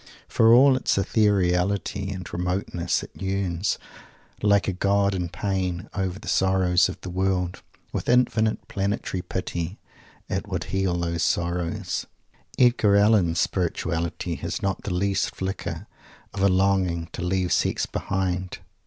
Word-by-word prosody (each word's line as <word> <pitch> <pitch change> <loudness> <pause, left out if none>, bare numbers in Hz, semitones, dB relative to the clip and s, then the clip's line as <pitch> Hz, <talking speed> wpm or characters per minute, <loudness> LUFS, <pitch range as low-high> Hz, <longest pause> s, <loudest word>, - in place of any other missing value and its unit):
For 115 0 +4
all 130 +3 +7
its 130 - 0
ethereality 100 -1 +1
and 95 -2 -6
remoteness, 90 -1 -1
it - - -10
yearns, 95 -1 -1 0.6
"like 100 -1 +3
a 95 - 0
God 100 +2 +2
in 90 -2 -2
pain," 90 -1 -2
over 95 -2 -2
the 105 0 -12
sorrows 95 -2 +3
of 90 - -7
the 95 - -6
world. 90 -1 -1 0.3
With - - -3
infinite 115 -3 +2
planetary 100 -1 -2
pity, 90 0 -4 0.5
it - - -3
would - - -2
heal 95 -2 +1
those 85 -1 -2
sorrows. 85 +2 -1 0.5
Edgar 120 -5 +4
Allen's 100 -5 +4
"spirituality" 85 -1 -1
has 85 +4 -4
not 95 -2 -1
the 100 - -2
least 100 +1 0
flicker 95 +1 -4 0.5
of 95 - -4
a 100 - +5
longing 95 -3 +1
to - - -6
"leave 90 0 0
Sex - - +1
behind." 95 -1 -2
95 Hz, 135 wpm, -25 LUFS, 90-100 Hz, 0.6 s, all